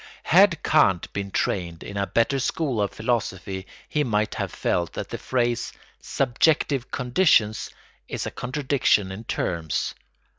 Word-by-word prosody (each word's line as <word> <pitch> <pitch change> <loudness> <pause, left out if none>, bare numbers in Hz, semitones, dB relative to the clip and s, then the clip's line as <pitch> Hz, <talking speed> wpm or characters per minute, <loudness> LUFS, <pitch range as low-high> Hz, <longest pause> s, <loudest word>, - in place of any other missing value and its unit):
Had 180 -1 +5
Kant 95 - +3
been 100 -1 -3
trained 85 -3 -2
in 100 - -8
a 100 0 -1
better 115 +4 +1
school 130 -3 -1
of 100 - +1
philosophy 100 -5 -2 0.2
he 150 - 0
might 105 -4 0
have - - -3
felt 85 -1 -1
that - - -5
the - - -5
phrase 120 -2 -1 0.3
"subjective 135 0 +1
conditions" 125 - +2 0.4
is - - -4
a - - -4
contradiction 130 -7 +1
in 105 +4 -8
terms. 85 -7 -2
115 Hz, 140 wpm, -24 LUFS, 100-135 Hz, 0.4 s, Had